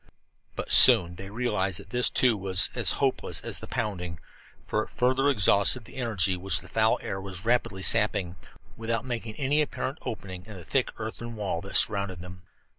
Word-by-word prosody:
But - - -6
soon 85 0 +8
they 95 +2 -10
realized 100 -5 -2
that - - -14
this, 125 0 +1
too, 125 -3 +2
was 95 -2 +2
as - - +1
hopeless - - -2
as - - -2
the - - -8
pounding, 90 -5 -5 0.5
for 105 - -2
it - - -8
further 130 +3 0
exhausted 105 0 +3
the - - -14
energy 100 -7 0
which 90 -2 -1
the 90 - -12
foul 110 +3 +1
air 95 - -5
was 95 0 -6
rapidly 115 -5 -1
sapping, 100 -6 +2 0.4
without 115 +1 -4
making 115 -3 -6
any 145 +2 +1
apparent 140 -1 -4
opening 95 -5 -8
in 105 - -10
the 90 -3 -11
thick 130 - 0
earthen 115 +1 -7
wall 100 -6 -4
that 95 - -9
surrounded 100 -4 +1
them. 90 0 -12
105 Hz, 185 wpm, -26 LUFS, 95-120 Hz, 0.5 s, soon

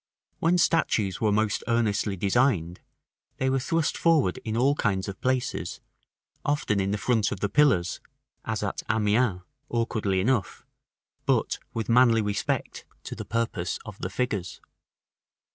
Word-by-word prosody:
When 170 +2 +3
statues 105 - +1
were 110 -2 +3
most 105 -1 +1
earnestly 110 -3 +1
designed, 95 -4 +1 0.6
they 130 0 +1
were 135 - +2
thrust 165 +4 0
forward 155 - +2
in 110 -1 -2
all 135 +4 +4
kinds 95 -8 -1
of 100 - -7
places, 130 -1 -1 0.6
often 145 -8 0
in 100 +2 0
front 110 -1 +1
of 100 - -4
the 100 - -1
pillars, 100 -9 +2 0.4
as - - -3
at - - -2
Amiens, 105 -2 +2 0.3
awkwardly 110 -5 0
enough, 115 +1 0 0.6
but - - +1 0.2
with 115 -1 -2
manly 115 -2 +5
respect 105 0 -2 0.2
to - - -6
the - - -7
purpose 115 -7 -2
of - - -9
the - - -3
figures. 105 -9 -3
110 Hz, 140 wpm, -26 LUFS, 100-125 Hz, 0.6 s, manly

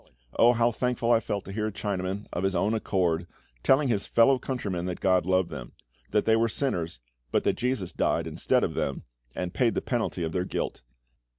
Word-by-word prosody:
Oh, 120 +1 +6
how 120 0 +3
thankful 120 0 0
I 115 - +6
felt 100 -3 -3
to 95 - -7
hear 105 +2 -1
a - - -3
Chinaman, 100 -1 -3
of 90 - -2
his 95 0 +1
own 105 +3 +1
accord, 90 -6 0 0.3
telling 135 - +4
his 105 -5 0
fellow 130 +3 +4
countrymen 100 -10 -3
that 90 - -4
GOD 95 -2 +2
loved 95 -1 +2
them; - - -7 0.4
that 105 0 +1
they 110 - +5
were 115 +1 +2
sinners, 85 - -2 0.3
but - - +2
that - - +2
JESUS 125 -8 -1
died - - +1
instead - - +1
of - - 0
them, 70 - -2 0.3
and 90 0 -3
paid 120 -3 +2
the - - +2
penalty 115 -7 -1
of 80 - -2
their 90 0 0
guilt. - - -3
100 Hz, 205 wpm, -27 LUFS, 90-115 Hz, 0.4 s, Oh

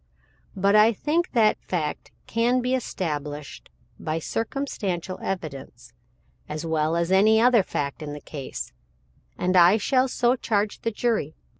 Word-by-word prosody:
But 200 +1 +2
I 215 +2 +6
think 325 - -1
that 220 -4 +3
fact 155 -5 -3 0.2
can 235 +2 +1
be 250 +1 -1
established 150 - -4 0.3
by 155 +1 -2
circumstantial 195 - -3
evidence, 135 -9 -6 0.6
as 155 +2 -4
well 160 0 0
as 170 +1 0
any 215 +3 +5
other 240 -1 +5
fact 140 -5 -4
in 150 -1 -5
the 150 - -7
case, 140 -2 -7 0.6
and 185 +1 0
I 180 +3 +7
shall 255 +4 +2
so 245 0 +2
charge 210 -4 -1
the 230 - 0
jury. 220 -8 -1
190 Hz, 140 wpm, -25 LUFS, 155-230 Hz, 0.6 s, I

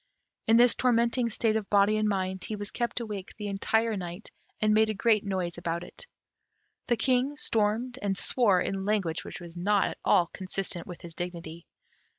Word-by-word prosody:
In 225 +1 +6
this 240 0 +6
tormenting 235 0 +2
state 220 0 +1
of 215 -2 -2
body 205 +1 +4
and 215 0 +1
mind, 190 -2 -2
he 215 - -4
was 205 0 -5
kept 240 0 -1
awake 210 -5 -6
the 210 - -6
entire 220 +3 +1
night, 180 +1 -7 0.3
and 215 0 +3
made 220 0 +4
a 215 - -1
great 215 0 +3
noise 185 -4 -3
about 170 0 -3
it. 335 - -11 0.8
The 240 - +2
King 260 +4 +1
stormed 230 +2 0
and 195 -2 -1
swore 205 -7 +3
in 195 +1 -2
language 190 -5 -1
which - - -8
was 170 -1 -11
not 200 +3 +2
at - - -9
all 175 - +4
consistent 190 -2 -3
with 175 - -9
his 170 -2 -8
dignity. 170 -1 -7
205 Hz, 185 wpm, -28 LUFS, 185-225 Hz, 0.8 s, In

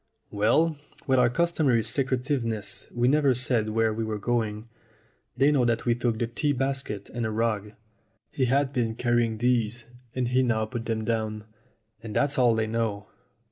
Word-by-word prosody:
"Well, 145 +10 +2 0.3
with 130 -1 +3
our 125 -1 +4
customary 145 -5 +1
secretiveness 125 -5 -1
we 120 0 +1
never 140 -1 +3
said 120 -3 +2
where 110 0 +1
we 115 +1 -3
were 110 -1 -3
going. 110 0 -2 0.7
They 140 +3 +4
know 140 -4 +3
that 120 -1 0
we 120 - +3
took 120 -1 -1
the 120 - 0
tea 145 +5 -1
basket 135 -6 -3
and 120 - -3
a 110 - -1
rug." 110 -2 -1 0.6
He 130 - 0
had 135 +2 +1
been 115 -3 -1
carrying 120 -2 +1
these, 120 -1 0 0.3
and 125 -2 -1
he 130 +1 +3
now 115 -3 +1
put 115 +1 -6
them 110 -1 -2
down. 110 -2 -2 0.6
"And 110 -2 -8
that's 145 -1 +1
all 120 -3 +4
they 110 0 0
know. 110 -2 -2
120 Hz, 175 wpm, -26 LUFS, 110-130 Hz, 0.7 s, our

